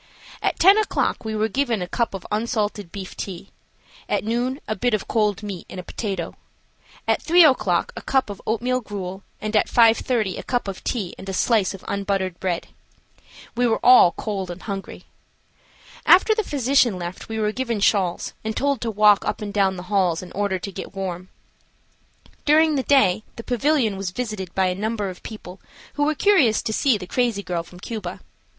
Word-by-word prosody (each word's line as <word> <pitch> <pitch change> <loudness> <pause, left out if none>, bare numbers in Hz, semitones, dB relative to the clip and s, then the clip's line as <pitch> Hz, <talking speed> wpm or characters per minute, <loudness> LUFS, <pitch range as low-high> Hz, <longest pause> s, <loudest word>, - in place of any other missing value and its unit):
At - - 0
10 390 +5 +6
o'clock 430 - 0
we 220 -1 -3
were 215 +1 +1
given 240 -1 0
a 180 - -4
cup 230 +2 -1
of 190 - -8
unsalted 210 -4 -2
beef 195 -2 -7
tea; 190 0 -7 0.6
at - - 0
noon 245 +5 -1
a 215 - -1
bit 235 +3 +1
of 210 - -5
cold 210 -2 0
meat 195 -4 -6
and 185 - -7
a - - -6
potatoe, 190 -3 -4 0.7
at - - +2
3 345 +1 +6
o'clock 205 - +2
a - - -6
cup 265 -5 0
of 200 - -9
oatmeal 250 +3 0
gruel 195 -3 -6 0.2
and 215 +1 -3
at 210 - +3
5.30 230 -3 +3
a - - -6
cup 245 -4 -1
of 195 -1 -6
tea 205 -8 -2
and 195 - -8
a - - -3
slice 205 -1 +2
of 190 - -14
unbuttered 195 -3 -2
bread. 180 -3 -2 0.9
We 245 0 +2
were 225 - +1
all 245 -8 +8
cold 195 -4 -4
and 175 +1 -8
hungry. 195 -2 -6 1.0
After 410 +4 +6
the 440 0 0
physician 265 - +2
left 175 +3 -7
we 220 - -3
were 215 -1 +1
given 235 -2 -2
shawls 195 -3 +1
and 220 0 -3
told 280 -3 0
to 230 - -1
walk 210 -1 +5
up - - -2
and 205 -1 -5
down 195 -2 +2
the 180 - -7
halls 180 -4 +2
in 180 - -11
order 200 -1 -1
to 195 +2 -6
get 190 +1 -8
warm. 185 -1 -5 1.1
During 310 +1 +4
the 275 - +1
day 255 -8 +3
the 230 - -8
pavilion 245 -4 +1
was 195 -1 -3
visited 210 -4 -5
by 190 - +3
a 180 - +1
number 210 +1 -2
of 180 - -13
people 195 -4 -10 0.3
who 290 - +1
were 305 +1 +1
curious 290 - +3
to 220 - -2
see 255 0 +3
the 190 - -8
crazy 230 0 0
girl 175 -1 -2
from 180 +1 -14
Cuba. 220 +2 -6
210 Hz, 195 wpm, -23 LUFS, 190-245 Hz, 1.1 s, all